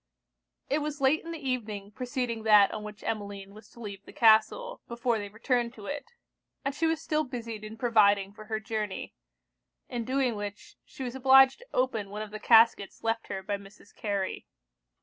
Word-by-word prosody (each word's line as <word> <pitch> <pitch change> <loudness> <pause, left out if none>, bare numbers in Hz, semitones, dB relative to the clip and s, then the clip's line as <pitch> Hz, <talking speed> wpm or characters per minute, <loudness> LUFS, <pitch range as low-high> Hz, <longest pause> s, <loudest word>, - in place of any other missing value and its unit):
It 290 - +1
was 300 -1 -4
late 275 +3 +3
in 335 - -8
the 305 -5 -6
evening 215 -5 -3
preceding 245 -1 -3
that 210 -2 +6
on 215 - -5
which 210 -1 -9
Emmeline 200 -2 -4
was 215 +1 -14
to - - -17
leave 200 -3 -7
the - - -13
castle, 230 - +3
before 235 -1 0
they 205 -1 -5
returned 235 +3 -1
to 210 - -11
it; 290 - -5 0.6
and 275 - 0
she 325 +3 +1
was 325 -1 +1
still 310 -1 0
busied 230 -5 -6
in 215 +1 -8
providing 205 -4 +3
for 215 +1 -11
her 220 0 -2
journey; 215 -2 -4 0.8
in 240 -2 -3
doing 255 -1 0
which, 205 0 -7
she 265 - -8
was 245 -1 -4
obliged 265 0 +6
to - - -16
open 230 -6 0
one 210 +2 -5
of 210 - -10
the 215 - -6
caskets 225 -3 +4
left 225 0 -1
her 190 -1 -5
by 200 +1 -2
Mrs. 200 0 -16
Carey. 200 -3 -3
225 Hz, 190 wpm, -29 LUFS, 205-260 Hz, 0.8 s, that